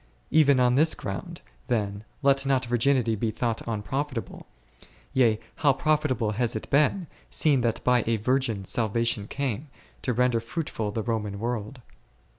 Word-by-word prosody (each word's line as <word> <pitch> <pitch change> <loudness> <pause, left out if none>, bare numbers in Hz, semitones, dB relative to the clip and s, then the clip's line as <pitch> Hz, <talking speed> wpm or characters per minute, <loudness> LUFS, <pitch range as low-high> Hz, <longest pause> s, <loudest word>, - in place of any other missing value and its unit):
Even 145 -4 +5
on 125 -1 +4
this 155 +5 +5
ground, 95 -2 -6 0.3
then, 100 -3 -1 0.2
let 135 0 +4
not 135 -2 +1
virginity 120 0 +2
be 110 +1 -1
thought 115 +1 -2
unprofitable; 115 +3 -4 0.7
yea, 115 -5 +3 0.2
how 145 -3 +4
profitable 140 -7 0
has 115 +2 0
it 110 - -5
been, 150 +6 +3 0.2
seeing 145 -5 +2
that 115 -2 -1
by 125 -2 +3
a 115 - +2
Virgin 115 -3 0
salvation 115 0 0
came, 140 0 -3 0.3
to 125 - -1
render 125 0 +2
fruitful 115 -2 -4
the 110 +1 -3
Roman 105 -3 -2
world. 120 +2 -4
120 Hz, 145 wpm, -26 LUFS, 110-135 Hz, 0.7 s, Even